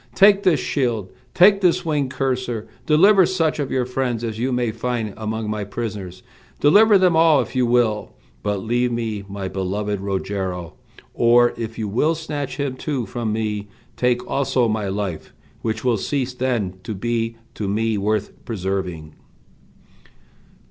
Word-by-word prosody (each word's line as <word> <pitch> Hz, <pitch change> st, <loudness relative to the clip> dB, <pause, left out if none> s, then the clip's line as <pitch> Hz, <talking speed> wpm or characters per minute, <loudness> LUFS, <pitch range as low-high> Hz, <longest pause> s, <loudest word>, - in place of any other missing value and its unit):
Take 200 Hz, 0 st, +6 dB
this 180 Hz, -7 st, +3 dB
shield, 115 Hz, -9 st, -1 dB, 0.2 s
take 195 Hz, +2 st, +6 dB
this 180 Hz, -3 st, +2 dB
winged 145 Hz, -4 st, 0 dB
courser, 130 Hz, -4 st, -2 dB, 0.2 s
deliver 190 Hz, +6 st, +6 dB
such 165 Hz, -5 st, 0 dB
of 140 Hz, -2 st, -1 dB
your 130 Hz, -2 st, 0 dB
friends 125 Hz, -2 st, -2 dB
as 110 Hz, -1 st, -4 dB
you 130 Hz, +3 st, 0 dB
may 125 Hz, -2 st, 0 dB
find 115 Hz, -2 st, -3 dB
among 110 Hz, 0 st, -3 dB
my 105 Hz, -1 st, -2 dB
prisoners, 100 Hz, -4 st, -6 dB, 0.4 s
deliver 205 Hz, +8 st, +6 dB
them 180 Hz, -3 st, +3 dB
all 160 Hz, -3 st, +5 dB
if 125 Hz, +1 st, -3 dB
you 125 Hz, -1 st, +2 dB
will, 115 Hz, -3 st, +1 dB, 0.3 s
but 105 Hz, -2 st, -2 dB
leave 120 Hz, +2 st, +1 dB
me 110 Hz, -3 st, -3 dB
my 100 Hz, -1 st, -4 dB
beloved 100 Hz, +2 st, -2 dB
Rogero; 95 Hz, -3 st, -3 dB, 0.4 s
or 120 Hz, +1 st, +4 dB
if 115 Hz, -1 st, -6 dB
you 110 Hz, -, -2 dB
will 150 Hz, +11 st, +1 dB
snatch 145 Hz, -4 st, -5 dB
him 140 Hz, -3 st, -2 dB
too 135 Hz, -4 st, -2 dB
from 115 Hz, +1 st, -3 dB
me, 105 Hz, -1 st, -2 dB, 0.3 s
take 125 Hz, 0 st, +1 dB
also 130 Hz, -3 st, +1 dB
my 110 Hz, -2 st, -1 dB
life, 95 Hz, -5 st, -4 dB, 0.3 s
which 110 Hz, -1 st, -2 dB
will 120 Hz, -3 st, +3 dB
cease 130 Hz, +4 st, -2 dB
then 120 Hz, -8 st, -2 dB
to 110 Hz, +2 st, -5 dB
be 115 Hz, +2 st, -2 dB, 0.2 s
to 105 Hz, -, -4 dB
me 110 Hz, +2 st, 0 dB
worth 105 Hz, +1 st, -1 dB
preserving." 95 Hz, -7 st, -4 dB
115 Hz, 155 wpm, -21 LUFS, 105-130 Hz, 0.4 s, Take